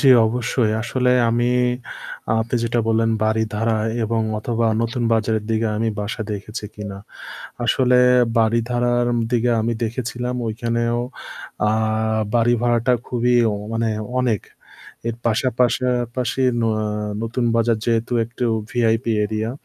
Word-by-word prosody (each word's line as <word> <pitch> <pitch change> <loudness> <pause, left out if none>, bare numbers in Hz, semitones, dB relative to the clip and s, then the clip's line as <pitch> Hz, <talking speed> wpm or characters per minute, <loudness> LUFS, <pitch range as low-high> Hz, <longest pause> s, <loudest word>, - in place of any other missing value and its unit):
জ্বি, 135 - +6 0.2
অবশ্যই 120 -1 0
আসলে 125 +1 0 0.2
আমি 120 +1 +1 0.9
আপনি 115 +2 -3
যেটা 115 +1 0
বললেন, 115 0 +2
বারিধারা 110 0 0 0.3
এবং 115 +1 0 0.2
অথবা 115 +1 -1 0.2
নতুন 120 +2 -2
বাজারের 110 -1 +1
দিকে 110 0 +1
আমি 115 +1 0
বাসা 105 +2 -3
দেখেছি 105 +2 -6
কিনা। 100 -2 -7 0.7
আসলে 125 +1 +3 0.4
বাড়ি 115 +1 +3
ধারার 120 0 +1 0.2
দিকে 120 -1 +2
আমি 115 +2 0
দেখেছিলাম 125 +1 -3
ওইখানেও 115 +1 -1 0.7
আ - - +2 0.6
বাড়ি 120 0 +4
ভাড়াটা 120 +1 +2
খুবই 125 0 +1 0.4
মানে 115 0 0 0.3
অনেক। 120 -6 +1 0.7
এর 115 - -3
পাশা 115 +3 +2
পাশাপাশি 125 +1 0 0.2
ন - - 0 0.6
নতুন 115 +2 -2
বাজার 115 -1 +2
যেহেতু 115 +1 0
একটু 125 +2 -5 0.3
ভিআইপি 115 -1 +1
এরিয়া 110 +2 -2
115 Hz, 120 wpm, -21 LUFS, 110-120 Hz, 0.9 s, জ্বি